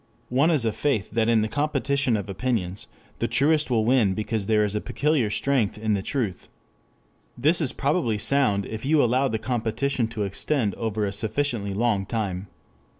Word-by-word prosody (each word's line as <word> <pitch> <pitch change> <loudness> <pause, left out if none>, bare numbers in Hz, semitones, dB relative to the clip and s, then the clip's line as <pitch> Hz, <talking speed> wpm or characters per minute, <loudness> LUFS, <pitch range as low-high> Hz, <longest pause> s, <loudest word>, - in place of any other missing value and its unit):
One 135 +6 +3
is 150 -8 +1
a 110 - +2
faith 125 -5 -1
that 115 -1 +1
in 115 -2 +3
the - - 0
competition 140 -2 0
of 100 - -5
opinions, 100 -3 -2 0.3
the - - 0
truest 150 +1 +2
will 115 -3 +2
win 115 -6 +3
because 110 -1 -2
there 110 -1 +3
is 105 - -2
a 105 - -1
peculiar 145 -7 0
strength 120 -2 0
in 110 0 0
the 100 - 0
truth. 105 -4 -3 0.9
This 155 +7 +3
is 140 - +1
probably 140 -6 0
sound 105 -4 +2
if 110 0 -6
you 145 +1 +3
allow 130 +3 +2
the 110 - -1
competition 120 +2 -1
to 110 -2 -4
extend 105 +2 -1
over 110 -2 -2
a 100 - -3
sufficiently 110 -1 -1
long 105 -2 0
time. 100 -4 -3
115 Hz, 180 wpm, -25 LUFS, 105-140 Hz, 0.9 s, One